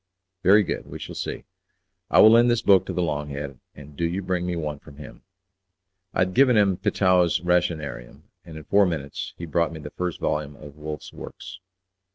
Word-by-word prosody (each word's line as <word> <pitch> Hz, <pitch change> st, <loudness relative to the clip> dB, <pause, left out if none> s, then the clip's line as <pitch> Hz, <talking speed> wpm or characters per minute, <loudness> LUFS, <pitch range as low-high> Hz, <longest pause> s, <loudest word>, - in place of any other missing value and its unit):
"Very 100 Hz, +3 st, +6 dB
good, -, -, -4 dB
we -, -, -8 dB
shall -, -, -8 dB
see. -, -, -5 dB, 0.7 s
I -, -, +6 dB
will 110 Hz, -, +9 dB
lend 120 Hz, +1 st, +6 dB
this 120 Hz, -1 st, +1 dB
book 95 Hz, -2 st, +5 dB
to -, -, -3 dB
the 90 Hz, -, 0 dB
'long 75 Hz, -2 st, -2 dB
head,' 70 Hz, -2 st, -6 dB, 0.2 s
and 75 Hz, 0 st, -13 dB
do 85 Hz, -, -4 dB
you 90 Hz, +4 st, -1 dB
bring 90 Hz, -1 st, -2 dB
me 90 Hz, -, -2 dB
one 75 Hz, -3 st, -4 dB
from 70 Hz, -2 st, -15 dB
him." 75 Hz, -2 st, -11 dB, 0.9 s
I -, -, -1 dB
had 95 Hz, 0 st, +1 dB
given 130 Hz, -1 st, +5 dB
him 100 Hz, -3 st, +3 dB
Petau's 95 Hz, -3 st, +2 dB
Rationarium, 85 Hz, -7 st, -2 dB, 0.2 s
and 80 Hz, -2 st, -11 dB
in 80 Hz, -, -9 dB
four 100 Hz, +3 st, +3 dB
minutes 85 Hz, +4 st, -5 dB
he 85 Hz, -, -6 dB
brought 85 Hz, +1 st, 0 dB
me 80 Hz, -, -8 dB
the 75 Hz, -1 st, -9 dB
first 90 Hz, -2 st, -4 dB
volume 75 Hz, -1 st, -2 dB
of 75 Hz, 0 st, -12 dB
Wolff's 75 Hz, 0 st, -7 dB
works. -, -, -10 dB
85 Hz, 205 wpm, -24 LUFS, 75-95 Hz, 0.9 s, will